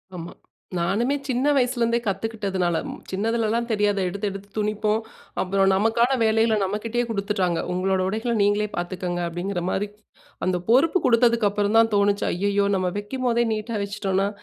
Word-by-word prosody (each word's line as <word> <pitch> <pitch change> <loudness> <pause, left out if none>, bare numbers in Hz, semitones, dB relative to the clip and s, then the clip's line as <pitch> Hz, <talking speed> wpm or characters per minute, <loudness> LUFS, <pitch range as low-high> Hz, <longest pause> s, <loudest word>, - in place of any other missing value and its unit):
ஆமா. 170 0 -7 0.4
நானுமே 205 +11 +1
சின்ன 255 0 0
வயசுலேருந்தே 240 -3 +2
கத்துக்கிட்டதுனால, 195 -5 -1 0.3
சின்னதுலலாம் 225 +3 0
தெரியாத 205 -2 +1
எடுத்து 200 +3 -3
எடுத்து 195 +1 -9
துணிப்போம். 210 0 0 0.4
அப்புறம் 195 +1 +2
நமக்கான 230 +6 +2
வேலைகளை 220 0 +3
நம்மகிட்டேயே 220 +5 -1
குடுத்துட்டாங்க. 200 -5 0
உங்களோட 185 +1 +1
உடைகள 220 +4 -1
நீங்களே 205 +1 +2
பார்த்துக்கோங்க. 175 0 -3
அப்டிங்கிற 175 +2 -3
மாரி. 205 +2 -1 0.6
அந்த 185 -1 +1
பொறுப்பு 290 +10 +4
குடுத்ததுக்கப்புறம் 225 -3 +3
தான் 225 0 +5
தோணுச்சு. 200 0 +2
ஐய்யயோ! 200 +2 +1
நம்ம 185 -1 0
வைக்கும்போதே 235 +2 0
நீட்டா 220 +2 -4
வச்சுட்டோம்னா. 200 -1 -1
205 Hz, 130 wpm, -24 LUFS, 195-230 Hz, 0.6 s, தான்